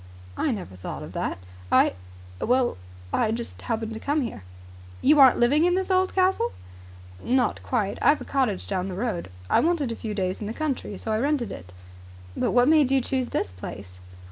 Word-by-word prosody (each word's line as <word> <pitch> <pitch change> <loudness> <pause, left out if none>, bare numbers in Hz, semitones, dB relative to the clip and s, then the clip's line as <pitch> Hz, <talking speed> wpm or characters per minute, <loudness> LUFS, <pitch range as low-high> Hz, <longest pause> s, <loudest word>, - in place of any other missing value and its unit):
"I - - 0
never 195 - -4
thought 90 - -6
of - - -9
that. - - -2 0.3
I - - +5 0.5
well, 250 +1 +2 0.4
I 220 - +2
just 235 +1 -5
happened 225 -1 -3
to 220 - -6
come 290 +4 0
here." 230 - -5 0.6
"You 295 +2 +4
aren't 265 -3 +8
living 280 +6 +4
in 355 +1 +3
this 380 +1 -1
old 375 0 +2
castle?" 370 -10 +2 0.7
"Not 250 -2 +1
quite. 215 -6 -1
I've 300 - +4
a - - -6
cottage 255 -9 0
down 190 -1 -2
the 185 - -5
road. 200 - -3 0.2
I - - +4
wanted 320 -7 +1
a - - -3
few 215 -2 -5
days 185 -1 -2
in 210 - -3
the 220 - -4
country 270 -8 -3
so 220 - -4
I 215 - +1
rented 275 -3 0
it." 90 0 -9 0.6
"But - - 0
what 245 0 +4
made 305 -3 +5
you 270 0 +4
choose 260 0 -1
this - - -2
place?" 90 0 -9
240 Hz, 195 wpm, -25 LUFS, 210-285 Hz, 0.7 s, aren't